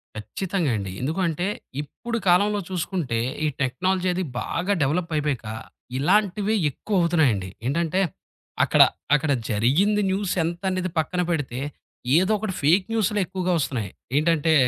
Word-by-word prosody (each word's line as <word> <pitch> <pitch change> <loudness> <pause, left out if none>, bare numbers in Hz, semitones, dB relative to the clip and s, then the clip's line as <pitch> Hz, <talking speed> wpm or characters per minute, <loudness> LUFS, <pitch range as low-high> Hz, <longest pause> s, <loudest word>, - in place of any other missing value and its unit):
ఖచ్చితంగా 170 - -2
అండి. 95 -2 -4
ఎందుకంటే, 170 +4 0 0.3
ఇప్పుడు 230 - -5
కాలంలో 205 +4 +4
చూసుకుంటే, 170 -9 -2 0.3
ఈ - - +3
టెక్నాలజీ 185 +8 0
అది 185 +1 -1 0.2
బాగా 180 +4 -1
డెవలపయిపయక, 150 -4 -1 0.5
ఇలాంటివి 205 +7 +2
ఎక్కువ 200 +8 -1
అవుతున్నాయండి. 140 - +2 0.2
ఏంటంటే, 165 +5 0 0.6
అక్కడ - - +4 0.3
అక్కడ 150 0 +1 0.2
జరిగింది 145 - +2
న్యూస్ 195 0 0
ఎంతనేది 185 +2 -2
పక్కన 180 +3 0
పెడితే, 135 -6 -2 0.6
ఏదోకటి 205 +2 +1
ఫేక్ 170 +7 +4
న్యూసులు 210 -2 +1
ఎక్కువగా 185 +1 -2
ఒస్తున్నాయి. 120 -9 -2 0.3
ఏంటంటే, 160 0 +3
175 Hz, 115 wpm, -24 LUFS, 145-190 Hz, 0.6 s, కాలంలో